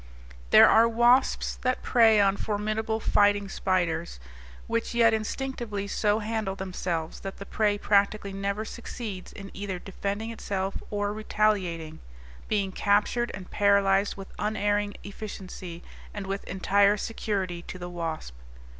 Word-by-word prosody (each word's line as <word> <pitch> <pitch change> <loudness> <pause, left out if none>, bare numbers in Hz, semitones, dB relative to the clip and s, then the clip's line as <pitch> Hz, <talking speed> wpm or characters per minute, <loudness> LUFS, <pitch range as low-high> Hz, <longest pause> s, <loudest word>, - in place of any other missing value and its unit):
There - - +9
are 230 +1 +6
wasps 240 +3 +3
that 255 0 0
prey 225 -3 +5
on 195 -1 +4
formidable 215 +2 -2
fighting 205 -1 +3
spiders, 175 - -1 0.5
which 230 +1 -2
yet 230 -1 +5
instinctively 220 -2 -3
so 205 +1 +1
handle 215 -3 -2
themselves 180 -4 -3
that 195 0 -7
the 200 - -8
prey 210 0 +1
practically 200 0 +1
never 200 +2 -2
succeeds 215 -5 -7
in 195 -1 -10
either 195 -1 -4
defending 200 +4 -4
itself 195 -3 -3
or 205 0 -1
retaliating, 190 -7 0 0.5
being 200 -3 0
captured 205 +5 +1
and 185 -1 -10
paralyzed 200 -1 +3
with 195 -1 -10
unerring 205 -1 0
efficiency 190 -4 -8 0.3
and 205 -2 -4
with 195 +1 -4
entire 200 +2 +3
security 195 -5 -3
to - - -6
the 175 -1 -6
wasp. 165 - -5
205 Hz, 130 wpm, -27 LUFS, 190-215 Hz, 0.5 s, There